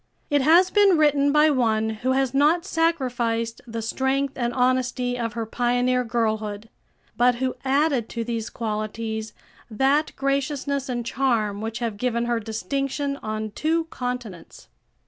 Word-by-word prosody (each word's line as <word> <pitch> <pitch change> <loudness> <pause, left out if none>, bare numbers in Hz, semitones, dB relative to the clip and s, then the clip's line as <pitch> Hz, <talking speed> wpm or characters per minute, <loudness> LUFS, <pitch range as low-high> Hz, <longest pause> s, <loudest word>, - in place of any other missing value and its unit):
It 290 -1 +3
has 345 +6 +5
been 405 -4 +5
written 290 -2 +3
by 300 +1 +5
one 220 -4 +1
who 245 +4 -1
has 265 -1 +1
not 305 +6 +3
sacrificed 250 -10 -1
the 230 -1 -5
strength 270 +4 0
and 240 -2 -1
honesty 250 0 0
of 230 -3 -3
her 230 0 -3
pioneer 245 +2 +1
girlhood, 220 -2 -2 0.5
but 245 0 +3
who 255 +1 -1
added 270 -3 +1
to 235 - -3
these 230 -1 -3
qualities 220 0 -4 0.4
that 270 +7 +2
graciousness 275 0 -1
and 240 -2 -2
charm 230 -5 0
which 225 +1 -4
have 230 -4 -3
given 235 +1 -1
her 235 -1 0
distinction 275 +5 -3
on 215 -2 -4
two 325 +8 0
continents. 245 -8 -6
250 Hz, 145 wpm, -24 LUFS, 225-275 Hz, 0.5 s, has